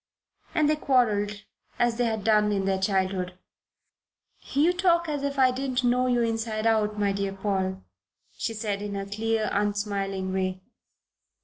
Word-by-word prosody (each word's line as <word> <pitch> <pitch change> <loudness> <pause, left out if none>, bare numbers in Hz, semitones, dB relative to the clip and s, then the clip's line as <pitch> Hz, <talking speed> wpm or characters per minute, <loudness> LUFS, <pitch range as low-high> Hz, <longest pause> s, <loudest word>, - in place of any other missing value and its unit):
and 310 -3 +3
they 305 - +3
quarrelled 210 -8 +1 0.3
as 240 -1 +1
they 245 - +2
had 220 -3 -1
done 210 -1 +3
in 195 -2 0
their 190 -1 +1
childhood. 190 -2 0 1.2
"You 310 +6 +4
talk 340 -2 +2
as 295 -2 -2
if 280 0 -2
I 260 -1 +5
didn't 260 0 -2
know 250 +1 +2
you 245 -1 +2
inside 225 -1 -2
out, 215 -2 +2
my 205 -1 +1
dear 195 0 -2
Paul," 190 -1 -2 0.5
she 225 - -3
said 205 -2 -2
in 205 -1 -4
her 195 0 -3
clear, 220 +2 -1
unsmiling 200 -2 -1
way. 185 -1 -1
210 Hz, 155 wpm, -26 LUFS, 195-245 Hz, 1.2 s, I